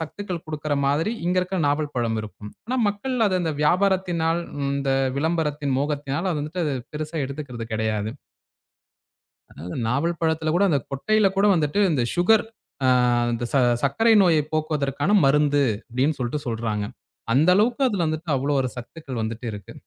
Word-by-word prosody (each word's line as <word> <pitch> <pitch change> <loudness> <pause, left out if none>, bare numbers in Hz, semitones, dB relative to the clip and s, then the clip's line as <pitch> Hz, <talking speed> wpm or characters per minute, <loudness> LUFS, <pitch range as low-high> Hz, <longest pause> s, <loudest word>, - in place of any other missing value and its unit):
சத்துக்கள் 175 +1 -5
குடுக்கிற 155 -1 -4
மாதிரி 155 +10 +1
இங்க 180 +1 +2
இருக்கிற 185 +1 -3
நாவல் 145 +1 0
பழம் 115 -2 0
இருக்கும். 105 0 -10 0.2
ஆனா 255 - -1
மக்கள் 210 +6 -3
ம் - - +5 0.2
அந்த 160 -2 -1
வியாபாரத்தினால் 175 -2 +1 0.3
இந்த 140 -1 -1 0.3
விளம்பரத்தின் 150 -3 0
மோகத்தினால் 145 +4 -2
அத 160 - -1
வந்துட்டு 165 +4 -3 0.3
பெருசா 155 +1 -4
எடுத்துக்கிறது 130 -5 -6
கெடயாது. 110 -1 -1 1.4
அதனால 85 +4 -9
நாவல் 155 +8 0
பழத்துல 160 -1 0
கூட 200 - +3
அந்தக் 140 -6 0
கொட்டையில 215 +10 +2
கூட 200 +1 +4
வந்துட்டு 160 +5 +1
இந்த 135 -6 +1
சுகர் 195 +5 +4 0.4
அ - - +4 0.5
இந்த 115 +1 -2
"ச - - +1 0.3
சர்க்கரை 225 +12 +3
நோய 170 -4 +4 0.2
போக்குவதற்கான 150 +1 -1
மருந்து!" 145 0 +3 0.3
அப்படின்னு 130 +5 0
சொல்லிட்டு 125 +4 -2
சொல்றாங்க. 110 -3 -2 0.5
அந்த 145 +8 +3
அளவுக்கு 235 +6 +2
அதுல 195 -7 -1
வந்துட்டு 155 +2 -4
அவ்வளவு 140 +1 0
ஒரு 130 - -1
சத்துக்கள் 130 0 -7
வந்துட்டு 115 +2 -4
இருக்கு. 100 -2 -9
150 Hz, 150 wpm, -23 LUFS, 135-175 Hz, 1.4 s, ம்